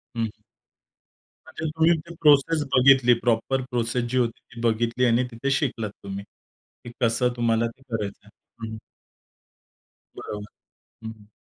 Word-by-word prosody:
हं, 115 - -1
हं. 115 - 0 1.2
म्हणजे 160 - -7
तुम्ही 160 +2 +3
ती 170 +2 -10
प्रोसेस 150 +1 +4
बघितली, 130 -1 +6
प्रॉपर 120 +3 0
प्रोसेस 120 0 0
जी 130 - -1
होती 120 -2 0
ती 115 - -10
बघितली 120 +2 +1
आणि 120 +1 +3
तिथे 120 +4 -2
शिकलात 130 -6 -1
तुम्ही, 100 0 -6 0.6
की 120 - -9
कसं 120 +1 +3
तुम्हाला 115 -1 +1
ते 115 +3 -10
करायचं 105 -6 -5
आहे 115 +2 -12
हं, - - -7
हं. 110 - -7 1.4
बरोबर, 105 -1 -6 0.6
हं. 110 -2 -10
120 Hz, 140 wpm, -24 LUFS, 115-135 Hz, 1.4 s, बघितली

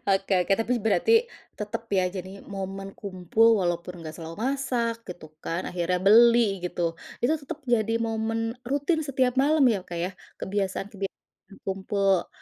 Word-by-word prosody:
Oke 195 0 +2
oke, 195 - +1
tapi, 245 +2 +1
berarti 225 - +3 0.4
tetep 210 +1 -4
ya, 190 -2 +3
jadi 190 +2 -7
momen 195 0 -6
kumpul, 195 +3 +1
walaupun 175 0 -2
nggak 160 -1 -7
selalu 165 0 -8
masak, 245 -2 -1
gitu 165 -4 -9
kan, 170 +3 -2
akhirnya 180 0 0
beli, 230 -2 +6
gitu. 170 -1 -1 0.3
Itu 260 - +4
tetep 290 +2 -7
jadi 225 -3 +1
momen 225 0 -1
rutin 290 +4 +1
setiap 260 -4 +1
malam, 295 +1 +4
ya, 200 - -1
Kak, 175 -2 -7
ya, 185 - -3 0.3
kebiasaan 195 0 -2
kebia 195 -1 -3 0.6
kumpul, 195 -1 +1
200 Hz, 150 wpm, -26 LUFS, 185-235 Hz, 0.6 s, beli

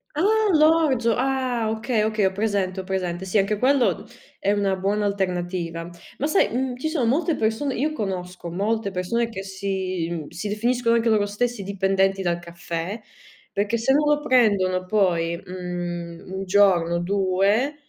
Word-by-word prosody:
Ah, 315 - 0 0.3
l'orzo. 305 -7 +4
Ah, 255 -3 0
okay, 220 0 0
okay, 215 -1 +1
ho 190 - +2
presente, 200 -2 -1
ho - - -4
presente. 185 -1 -3
Sì, 190 +3 0
anche 200 +1 +1
quello 260 -1 +2 0.3
è 200 - +1
una 200 -2 +1
buona 200 +2 0
alternativa. 175 -3 -2 0.3
Ma 285 - -1
sai, 310 +6 +3
uhm, 255 +1 -1
ci 315 +5 -2
sono 295 -7 0
molte 310 +7 +1
persone 225 +5 -1
io 305 +5 0
conosco 180 - -4
molte 205 +4 -1
persone 215 +6 -1
che 195 -3 -6
si 190 -3 -3
mhmm, 160 -4 -5
si 175 +5 -5
definiscono 235 +2 +1
anche 230 0 +2
loro 210 -2 +2
stessi 235 +1 -2
dipendenti 195 0 +1
dal 175 -1 0
caffè, 170 +4 -5 0.5
perché 205 +3 0
se 250 +4 +2
non 295 - +3
lo 295 0 +3
prendono 200 -9 +3
poi, 170 -5 +1
mhmm, 175 -1 -6
1 190 0 -3
giorno 180 -3 +3
o - - 0
2 200 +8 +1
200 Hz, 165 wpm, -23 LUFS, 185-235 Hz, 0.5 s, l'orzo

